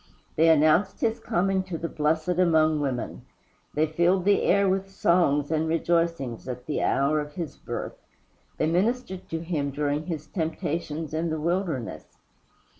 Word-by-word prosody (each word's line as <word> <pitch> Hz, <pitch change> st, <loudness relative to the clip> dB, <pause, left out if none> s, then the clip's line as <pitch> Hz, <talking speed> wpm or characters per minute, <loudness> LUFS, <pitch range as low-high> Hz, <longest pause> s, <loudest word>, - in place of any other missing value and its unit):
They 165 Hz, +1 st, +5 dB
announced 160 Hz, +5 st, +3 dB
his 225 Hz, +1 st, +1 dB
coming 195 Hz, -1 st, +1 dB
to 180 Hz, -3 st, -4 dB
the 165 Hz, -, -3 dB
Blessed 155 Hz, +1 st, 0 dB
among 160 Hz, -3 st, +4 dB
Women. 135 Hz, -4 st, -3 dB, 0.5 s
They 155 Hz, +2 st, +3 dB
filled 175 Hz, +4 st, +1 dB
the 200 Hz, 0 st, +4 dB
air 200 Hz, +1 st, +3 dB
with 195 Hz, +1 st, 0 dB
songs 170 Hz, -6 st, +2 dB
and 160 Hz, 0 st, +1 dB
rejoicings 165 Hz, -7 st, 0 dB
at 125 Hz, -1 st, -6 dB
the 150 Hz, -, -2 dB
hour 140 Hz, +3 st, +2 dB
of 150 Hz, 0 st, -5 dB
his 165 Hz, -4 st, -5 dB
birth. -, -, -6 dB, 0.6 s
They -, -, +1 dB
ministered 190 Hz, +4 st, -1 dB
to 165 Hz, 0 st, -3 dB
him 160 Hz, -4 st, -2 dB
during 145 Hz, +2 st, -2 dB
his 155 Hz, -4 st, -4 dB
temptations 160 Hz, -2 st, -3 dB
in 165 Hz, +1 st, -1 dB
the 160 Hz, 0 st, -2 dB
wilderness. 165 Hz, -, -3 dB
160 Hz, 155 wpm, -26 LUFS, 150-180 Hz, 0.6 s, They